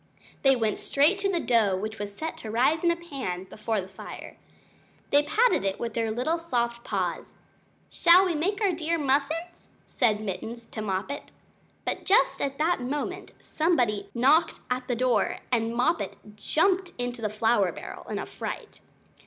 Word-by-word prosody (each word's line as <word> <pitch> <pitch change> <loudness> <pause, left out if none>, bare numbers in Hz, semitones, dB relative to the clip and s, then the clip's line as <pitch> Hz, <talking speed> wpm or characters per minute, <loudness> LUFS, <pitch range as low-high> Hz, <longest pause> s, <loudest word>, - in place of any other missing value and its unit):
They 270 -1 +5
went 220 -4 0
straight 305 +8 +3
to 395 0 0
the 350 - +1
dough 220 - +2
which 215 +2 -5
was 205 -1 -5
set 320 +1 -4
to 220 - -8
rise 260 +9 +2
in 345 - +4
a 340 - +3
pan 270 - -5
before 215 +3 -3
the 185 - -5
fire. 190 - -9 0.8
They 285 - +6
patted 425 - +2
it 195 -1 -1
with 230 -1 -3
their 225 -1 0
little 255 +10 0
soft 235 -7 -1
paws - - -3 0.6
"Shall 350 +3 +6
we 360 - 0
make 360 +7 0 0.2
dear 330 +1 0
little 300 - -3
muffins?" 305 +6 0 0.2
said 220 -6 +1
Mittens 220 +3 -5
to 220 - -5
Moppet. 210 +7 -3 0.5
But - - -2
just 415 +6 +3
at 275 0 -1
that 320 -1 +1
moment 280 +4 -3
somebody 240 - 0
knocked 280 +8 +4
at 250 0 -1
the 250 - 0
front - - -8
door, 250 -4 +2
and 230 -1 +1
Moppet 315 +8 0 0.2
jumped 360 - +1
into 245 -1 -3
the 215 - 0
flour 215 -3 +2
barrel - - -9
in - - -2
a - - -3
fright. - - -7
250 Hz, 175 wpm, -27 LUFS, 220-325 Hz, 0.8 s, They